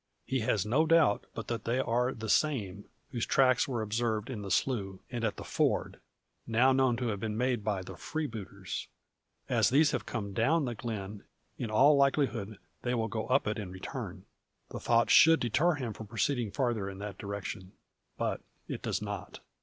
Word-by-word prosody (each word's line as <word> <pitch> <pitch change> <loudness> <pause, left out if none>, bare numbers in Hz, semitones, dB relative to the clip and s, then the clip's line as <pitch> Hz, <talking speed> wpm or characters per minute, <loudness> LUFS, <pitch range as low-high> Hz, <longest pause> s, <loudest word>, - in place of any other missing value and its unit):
He 130 - 0
has 105 -3 +1
no 140 +9 +2
doubt, 160 -10 +4
but - - -5
that 115 -1 -3
they 120 +2 +1
are 125 0 +1
the 110 -3 -6
same, 105 -8 +1 0.3
whose 120 -4 -2
tracks 130 -2 +4
were 120 -5 -2
observed 110 +1 -1
in 110 -5 -5
the 100 - -6
slough, 95 0 0
and 120 -1 -3
at 110 - 0
the - - -6
ford - - 0 0.5
now 120 +3 +4
known 130 -2 +3
to 125 -1 -1
have 105 -2 -2
been 110 0 -3
made 125 -2 0
by 100 -3 -1
the 95 0 -9
freebooters. 115 - -5 0.6
As - - +3
these 145 +2 +4
have 130 - -3
come 100 -4 -4
down 140 +9 +2
the 120 - -2
glen, 105 -3 -5 0.4
in 120 - -3
all 135 +7 +6
likelihood 135 -7 +1 0.2
they 125 0 -1
will 115 -1 -1
go 110 0 -3
up 130 +3 +3
it 105 +1 -1
in 100 -4 -5
return. 95 0 -7 0.5
The - - -5
thought 115 0 +3
should 165 0 +8
deter 150 +9 +2
him 125 -6 -4
from 110 +1 -9
proceeding 120 +2 0
farther 115 -3 -1
in 95 - -8
that 100 -1 -7
direction. 100 -2 -6 0.4
But - - -1 0.3
it - - -5
does - - -2
not. - - -6
115 Hz, 190 wpm, -31 LUFS, 105-130 Hz, 0.6 s, should